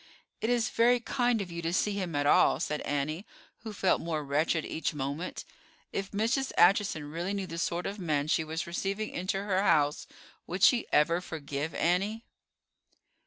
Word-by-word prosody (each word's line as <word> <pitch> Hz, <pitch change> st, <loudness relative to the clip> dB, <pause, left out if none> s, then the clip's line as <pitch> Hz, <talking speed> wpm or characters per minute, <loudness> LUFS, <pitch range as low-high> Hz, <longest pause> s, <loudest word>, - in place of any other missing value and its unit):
"It 225 Hz, -, 0 dB
is 240 Hz, -2 st, +1 dB
very 240 Hz, +2 st, +4 dB
kind 240 Hz, -2 st, 0 dB
of 180 Hz, -, -10 dB
you 170 Hz, 0 st, -5 dB
to 165 Hz, 0 st, -2 dB
see 195 Hz, +4 st, +1 dB
him 185 Hz, -5 st, -3 dB
at 145 Hz, 0 st, +1 dB
all," 145 Hz, -, +4 dB
said 150 Hz, 0 st, -2 dB
Annie, 145 Hz, +5 st, -2 dB, 0.4 s
who 225 Hz, -1 st, -7 dB
felt 195 Hz, -2 st, +1 dB
more 160 Hz, -2 st, -2 dB
wretched 155 Hz, +3 st, 0 dB
each 160 Hz, 0 st, -3 dB
moment. 145 Hz, +5 st, -4 dB, 0.5 s
If 195 Hz, 0 st, -3 dB
Mrs. 230 Hz, +6 st, 0 dB
Acheson 175 Hz, -5 st, +3 dB
really 175 Hz, +5 st, -3 dB
knew 195 Hz, -1 st, -2 dB
the 165 Hz, -2 st, -6 dB
sort 175 Hz, 0 st, -1 dB
of 200 Hz, +1 st, -4 dB
man 150 Hz, -5 st, 0 dB
she 160 Hz, -, +2 dB
was 160 Hz, +1 st, -4 dB
receiving 195 Hz, +5 st, -3 dB
into 190 Hz, +2 st, -2 dB
her 195 Hz, -2 st, +1 dB
house 150 Hz, -6 st, +2 dB, 0.4 s
would 180 Hz, +2 st, -3 dB
she 245 Hz, -3 st, +5 dB
ever 170 Hz, +4 st, +3 dB
forgive 150 Hz, -2 st, -5 dB
Annie? 195 Hz, +6 st, 0 dB
175 Hz, 175 wpm, -29 LUFS, 155-200 Hz, 0.5 s, she